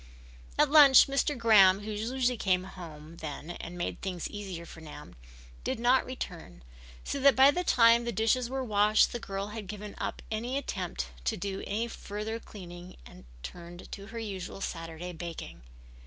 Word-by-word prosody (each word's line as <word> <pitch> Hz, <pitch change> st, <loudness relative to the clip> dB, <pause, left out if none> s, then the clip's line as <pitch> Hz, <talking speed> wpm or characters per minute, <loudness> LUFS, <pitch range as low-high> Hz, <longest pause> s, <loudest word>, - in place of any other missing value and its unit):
At 300 Hz, -1 st, +4 dB
lunch 285 Hz, -4 st, +9 dB
Mr. 275 Hz, +1 st, 0 dB
Graham, 205 Hz, -4 st, +6 dB
who 215 Hz, +1 st, -5 dB
usually 245 Hz, +4 st, 0 dB
came 185 Hz, -4 st, +1 dB
home 165 Hz, -4 st, -10 dB
then 155 Hz, +1 st, -6 dB
and 175 Hz, 0 st, -8 dB
made 175 Hz, -, -3 dB
things 180 Hz, -3 st, -3 dB
easier 190 Hz, -5 st, -7 dB
for 165 Hz, -, -12 dB
Nan, 155 Hz, -, -11 dB, 0.5 s
did -, -, -2 dB
not 245 Hz, +2 st, +3 dB
return, 170 Hz, -, -7 dB, 0.4 s
so 280 Hz, -, -3 dB
that 275 Hz, 0 st, +6 dB
by 270 Hz, +2 st, +7 dB
the 360 Hz, +4 st, -1 dB
time 235 Hz, -6 st, +5 dB
the 235 Hz, -, -2 dB
dishes 230 Hz, +3 st, +1 dB
were 265 Hz, 0 st, -2 dB
washed 210 Hz, -2 st, +4 dB
the 240 Hz, -, -4 dB
girl 195 Hz, -2 st, -4 dB
had 210 Hz, -2 st, -7 dB
given 210 Hz, 0 st, -7 dB
up -, -, -4 dB
the 235 Hz, +5 st, -2 dB
attempt 65 Hz, -, -4 dB, 0.2 s
to -, -, 0 dB
do 195 Hz, +1 st, -4 dB
any 225 Hz, +3 st, -1 dB
further 215 Hz, 0 st, -5 dB
cleaning 175 Hz, -5 st, -11 dB
and 60 Hz, 0 st, -14 dB, 0.2 s
turned 175 Hz, -, -9 dB
to 200 Hz, 0 st, -8 dB
her 230 Hz, +1 st, -8 dB
usual 195 Hz, -5 st, -5 dB
Saturday 165 Hz, -1 st, -5 dB
baking. 170 Hz, -, -7 dB
205 Hz, 170 wpm, -30 LUFS, 175-235 Hz, 0.5 s, lunch